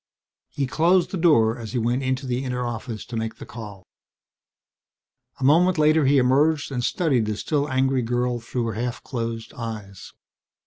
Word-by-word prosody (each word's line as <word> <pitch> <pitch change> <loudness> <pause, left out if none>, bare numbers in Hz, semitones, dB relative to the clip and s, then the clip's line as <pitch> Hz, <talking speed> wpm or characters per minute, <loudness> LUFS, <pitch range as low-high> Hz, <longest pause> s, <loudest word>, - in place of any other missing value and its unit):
He 140 - -2
closed 170 +7 +2
the - - -3
door 125 -9 +3
as 115 0 -7
he - - -1
went 120 +3 0
into 130 +1 -1
the 125 +1 -2
inner 125 -1 -2
office 115 -1 -5
to 120 - -8
make 110 0 -3
the - - -10
call. 105 -5 -10 1.5
A - - -5
moment 170 +6 +4
later 155 0 +4
he 140 +1 +4
emerged 145 +4 +2
and 125 -2 -2
studied 130 - +1
the 105 -1 -2
still 145 +2 -1
angry 130 0 +1
girl 120 +1 -1
through 120 0 -3
half 120 +3 -4
closed 115 -2 -5
eyes. 110 -7 -7
125 Hz, 170 wpm, -24 LUFS, 115-140 Hz, 1.5 s, moment